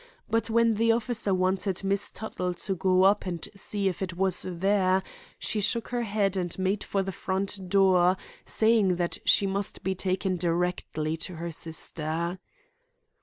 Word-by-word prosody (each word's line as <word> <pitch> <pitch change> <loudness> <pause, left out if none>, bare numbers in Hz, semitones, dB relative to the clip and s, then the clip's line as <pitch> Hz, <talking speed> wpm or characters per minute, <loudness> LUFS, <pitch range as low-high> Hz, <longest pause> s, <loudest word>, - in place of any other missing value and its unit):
But 225 +1 0
when 230 0 +4
the 230 +2 +3
officer 230 -2 0
wanted 185 +1 0
Miss 195 +1 +1
Tuttle 180 -5 -4
to 195 - -3
go 185 0 +3
up 195 0 +3
and 175 -3 -3
see 200 0 -2
if 185 - -2
it 175 -2 -4
was 190 -1 +2
there, 190 +1 +2 0.3
she 215 - -1
shook 230 +3 +1
her 245 -1 -1
head 205 -3 0
and 180 -2 -2
made 190 +2 0
for 195 -1 -1
the 195 - -3
front 190 0 -2
door, 185 -1 +4 0.3
saying 220 -4 +3
that 175 0 -2
she 200 - +5
must 195 +1 -3
be 190 - 0
taken 185 0 -1
directly 170 -2 -1
to 175 +2 -5
her 170 +1 -5
sister." 160 +2 -3
190 Hz, 165 wpm, -27 LUFS, 180-200 Hz, 0.3 s, she